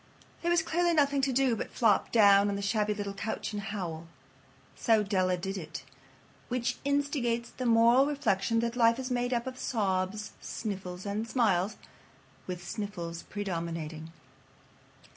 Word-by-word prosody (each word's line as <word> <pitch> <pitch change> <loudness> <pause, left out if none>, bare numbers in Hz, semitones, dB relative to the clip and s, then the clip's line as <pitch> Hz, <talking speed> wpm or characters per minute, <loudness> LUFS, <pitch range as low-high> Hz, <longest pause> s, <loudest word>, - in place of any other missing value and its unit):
There 345 - 0
was 345 -1 +3
clearly 340 +1 +1
nothing 280 -2 +3
to 270 0 +1
do 260 -2 +2
but - - -4
flop 220 -5 +2
down 200 -2 +6
on 200 - -1
the 200 - -4
shabby 210 0 +1
little 200 -1 -4
couch 205 +2 -4
and 205 - -3
howl. 175 -6 -5 0.7
So 225 -3 +3
Della 185 -3 +1
did 195 +2 -4
it. 160 - -7 0.6
Which 250 0 -1
instigates 280 -5 0
the 255 - -3
moral 235 +4 +5
reflection 230 -6 +1
that 235 0 -2
life 230 -1 +4
is 260 -1 -4
made 245 0 0
up 235 -1 0
of 255 -1 -6
sobs, 205 -1 -1
sniffles, 185 -4 -5
and 210 +3 -2
smiles, 210 -5 +2 0.7
with 175 -1 -6
sniffles 175 -6 -5
predominating. 165 -5 -4
215 Hz, 150 wpm, -30 LUFS, 190-245 Hz, 0.7 s, down